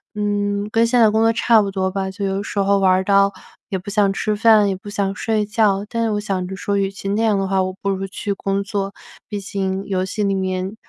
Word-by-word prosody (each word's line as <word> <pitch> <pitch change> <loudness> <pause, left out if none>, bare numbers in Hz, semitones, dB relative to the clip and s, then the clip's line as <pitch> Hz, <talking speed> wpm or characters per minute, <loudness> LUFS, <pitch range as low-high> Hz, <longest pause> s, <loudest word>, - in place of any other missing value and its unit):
嗯 205 0 -1
跟 230 +1 +3
现 240 +1 +2
在 220 -2 +6
工 220 +1 +2
作 225 0 +4
差 230 -1 +4
不 200 - -2
多 190 -1 -1
吧。 190 0 -2
就 200 +1 -4
有 195 0 -1
时 205 - -7
候 200 0 +3
玩 190 -1 +4
儿 185 +1 +2
到 200 0 +4 0.4
也 190 - -1
不 190 +3 -12
想 200 -1 +3
吃 210 +2 -1
饭， 215 -1 +5
也 195 - 0
不 195 +2 -10
想 200 -1 -1
睡 215 -1 0
觉 205 -2 +1
但 230 +1 -3
是 225 - +1
我 210 - 0
想 195 -3 -2
着 190 - -6
说， 200 +1 -2
与 195 -1 +1
其 195 0 -8
那 210 +3 0
样 215 -3 +2
的 195 - -1
话， 190 0 +1
我 185 0 -1
不 200 - -1
如 195 0 -3
去 200 +1 -3
工 195 0 -2
作。 200 -1 -3 0.4
毕 205 - -3
竟 195 0 -3
游 185 -2 -1
戏 210 +3 -3
里 200 -1 +1
面， 185 +1 -2
200 Hz, 280 characters per minute, -20 LUFS, 195-210 Hz, 0.4 s, 在